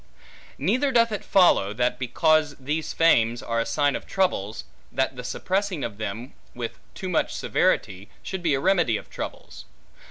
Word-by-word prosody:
Neither 250 - +1
doth 230 -2 +4
it 210 - -3
follow, 170 - +4
that 125 +3 0
because 150 +4 +2
these 150 +4 -3
fames 120 -8 +3
are 115 0 -1
a 115 - -1
sign 145 +4 +1
of - - -6
troubles, 110 - -1 0.3
that 130 0 0
the 125 - -7
suppressing 190 +3 -2
of 110 -2 -5
them 110 +5 -5 0.2
with 120 -2 -5 0.2
too 190 - -5
much 175 -3 0
severity, 95 +1 0
should 190 -1 -5
be 160 -5 +2
a - - -1
remedy 175 - +2
of - - -12
troubles. - - -7
140 Hz, 165 wpm, -25 LUFS, 115-185 Hz, 0.3 s, doth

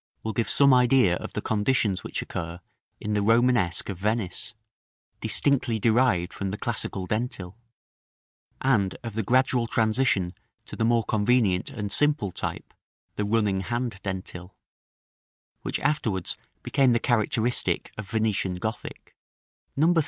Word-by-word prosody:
will 110 - -3
give 115 +2 -1
some 140 -1 +6
idea 125 -7 +4
of - - -8
the - - -4
conditions 105 -2 +1
which - - -4
occur 85 0 -6 0.4
in 105 - -3
the 105 - +1
Romanesque 115 -5 +2
of 95 -4 -5
Venice, 110 +1 -2 0.6
distinctly 115 +2 +1
derived 110 -5 +2
from 100 - -3
the 100 - -4
classical 105 -4 -1
dentil; 105 -3 -3 1.1
and 110 -8 +1
of 115 -2 -5
the 110 - -1
gradual 125 +1 +2
transition 110 -5 +1 0.3
to - - -9
the - - -1
more 115 0 +3
convenient 105 -4 +1
and 105 -3 -5
simple 145 -6 +2
type, - - -5 0.4
the 105 - -1
running 105 -2 +1
hand 120 -1 -3
dentil, 90 -1 -6 1.1
which - - -3
afterwards 120 - 0 0.3
became 135 -3 +3
the 120 - +2
characteristic 120 +1 +1
of 105 -3 -8
Venetian 110 -4 0
Gothic. 110 +5 -6 0.6
No. 160 +5 +4
110 Hz, 135 wpm, -26 LUFS, 95-120 Hz, 1.1 s, some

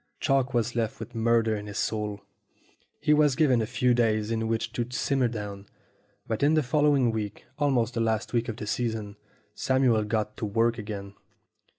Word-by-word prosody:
Chalk 135 -3 +1
was 120 0 0
left 115 -2 -1
with 120 - -8
murder 115 -1 +2
in 105 0 -6
his 100 0 -6
soul. 105 -2 -2 0.8
He 150 - +3
was 150 -3 +4
given 130 -6 +3
a 110 - -2
few 125 0 +2
days 110 -2 +1
in 115 0 -1
which 115 0 -2
to 120 +1 -2
simmer 130 0 +1
down. 105 -3 -6 0.6
But 110 +2 -3
in 145 +3 +4
the 155 - +3
following 140 -2 +3
week, 105 -2 -5
almost 125 -5 +1
the 115 - -1
last 110 0 -1
week 120 -1 0
of 110 - -4
the 105 - -5
season, 110 -2 -2 0.4
Samuel 130 -5 +2
got 105 0 -2
to - - -3
work 115 +3 +1
again. 100 -2 -6
115 Hz, 185 wpm, -27 LUFS, 110-125 Hz, 0.8 s, was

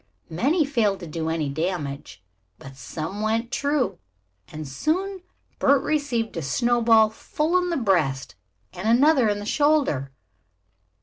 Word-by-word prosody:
Many 290 - +1
failed 225 -8 0
to - - -6
do 160 +1 -3
any 160 -2 -1
damage, 140 - -4 0.3
but 135 0 -12
some 165 +8 -6
went 225 +2 -1
true, 285 -2 -1 0.5
and 155 -1 -8
soon 365 - -2 0.4
Bert 280 0 +3
received 285 -7 -1
a 165 - -3
snowball 225 - +3
full 305 +9 -2
in 360 0 -2
the 340 - -1
breast 165 - 0 0.4
and 185 +4 -5
another 260 0 +4
in 205 - 0
the 205 - -6
shoulder. 280 - +1
220 Hz, 135 wpm, -24 LUFS, -, 0.5 s, another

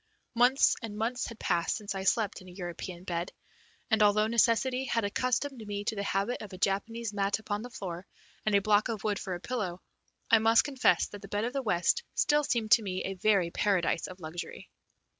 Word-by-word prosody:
Months 245 +3 +4
and 215 -3 -6
months 235 +3 -1
had 230 - -9
passed 170 -5 0
since 210 -2 -5
I 190 0 -4
slept 210 -2 +1
in 185 - -13
a - - -12
European 175 -1 -6
bed, 175 0 -3 0.6
and, 220 0 +4
although 210 +1 +5
necessity 235 +3 +2
had 230 -3 0
accustomed 255 +3 -1
me 205 0 -3
to 220 - -2
the 200 - -2
habit 200 +4 -1
of 210 -2 -8
a - - -7
Japanese 210 +4 -1
mat 200 0 +1
upon 210 -1 -4
the 245 - -7
floor 180 -5 -7 0.4
and 215 -1 +2
a 200 - +5
block 210 +2 +3
of 220 -3 -4
wood 205 -2 0
for 185 - -4
a - - -7
pillow, 190 -5 -3 0.5
I 225 - +7
must 225 +1 +5
confess 265 -11 +2
that 205 - -10
the 195 - -9
bed 205 +2 -2
of 240 +2 -2
the 275 - -1
West 210 - +1
still 295 0 +3
seemed 230 -5 -1
to 230 - +7
me 185 -3 -3
a 195 - -3
very 190 -2 +2
paradise 185 -5 +1
of 185 0 -10
luxury. 165 +1 -7
210 Hz, 215 wpm, -30 LUFS, 190-230 Hz, 0.6 s, I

